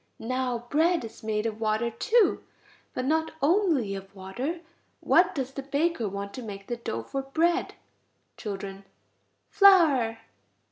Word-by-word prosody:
Now 250 0 -2
bread 330 -1 +2
is 225 - -11
made 215 0 -2
of 225 0 -3
water 220 +2 0
too, 460 - +2 0.5
but 255 - -2
not 320 +3 0
only 310 - +2
of 195 0 -8
water. 245 - -4 0.4
What - - +3
does 265 -2 -3
the 275 - -5
baker 280 -4 0
want 200 +1 -6
to 255 - -6
make 200 -4 -8
the 240 - -4
dough 115 - -4
for 270 - -4
bread?... 335 +7 0 0.6
Children. 195 -2 -6 0.7
Flour. 310 - +5
250 Hz, 140 wpm, -27 LUFS, 210-320 Hz, 0.7 s, Flour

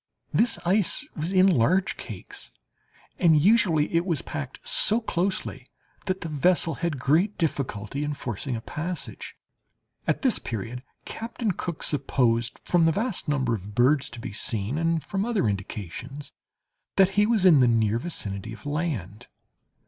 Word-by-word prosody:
This 235 +1 +3
ice 200 - +2
was 160 +4 -3
in 185 -1 +5
large 185 +3 +3
cakes, 105 -7 -7 0.7
and 160 -3 +5
usually 175 -5 +3
it 170 0 +3
was 170 -5 -1
packed 485 - -7
so - - +4
closely 190 -4 -2 0.4
that 185 0 -1
the - - -4
vessel 165 +3 +2
had 170 -4 -1
great 160 +11 +2
difficulty 140 - -2
in 150 0 -2
forcing 125 -1 -4
a 115 - -5
passage. 170 +8 -5 0.7
At - - 0
this 260 -4 +4
period 115 +3 -5 0.2
Captain 230 -1 -3
Cook 170 -2 -5
supposed, 125 -4 +1
from 175 - +2
the 165 0 +5
vast 210 +2 -2
number 130 -5 +1
of 105 -1 -6
birds 135 +3 +3
to 120 - -9
be 105 - -6
seen, 110 +5 -2
and 165 -1 0
from 195 0 -2
other 220 - 0
indications, 105 - -5 0.6
that 190 -1 +5
he 205 +2 +2
was 220 -5 +2
in 165 -6 +7
the 125 - +5
near 115 -1 +2
vicinity 110 - -3
of 115 - -12
land. 130 - -3
150 Hz, 155 wpm, -26 LUFS, 120-185 Hz, 0.7 s, in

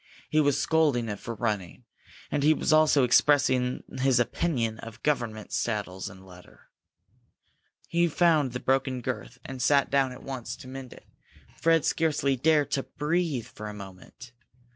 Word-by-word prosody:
He 155 - +3
was 145 -3 +2
scolding 145 -8 +2
it 105 -1 -4
for 115 - -6
running, 105 -5 -3 0.5
and 145 - 0
he 155 +2 +4
was 155 - +1
also 155 -3 +5
expressing 125 -1 +3 0.2
his 130 -2 +3
opinion 120 -4 -1
of 115 0 -11
government 120 -7 -1
saddles 100 -5 -2
and 95 0 -14
leather. 90 -1 -17 1.2
He 170 0 +2
found 155 -5 +2
the 125 - -3
broken 130 -1 0
girth, 125 0 -5
and 130 -1 -6
sat 140 +2 +3
down 135 -2 +2
at 125 - -11
once 130 -3 -5
to 130 - -13
mend 130 -1 -8
it. - - -14 0.5
Fred 165 -1 +2
scarcely 145 -4 +1
dared 145 +1 +2
to 140 - +1
breathe 150 -4 -2
for 105 - -9
a 105 - -8
moment. 100 +5 -12
130 Hz, 160 wpm, -27 LUFS, 115-150 Hz, 1.2 s, also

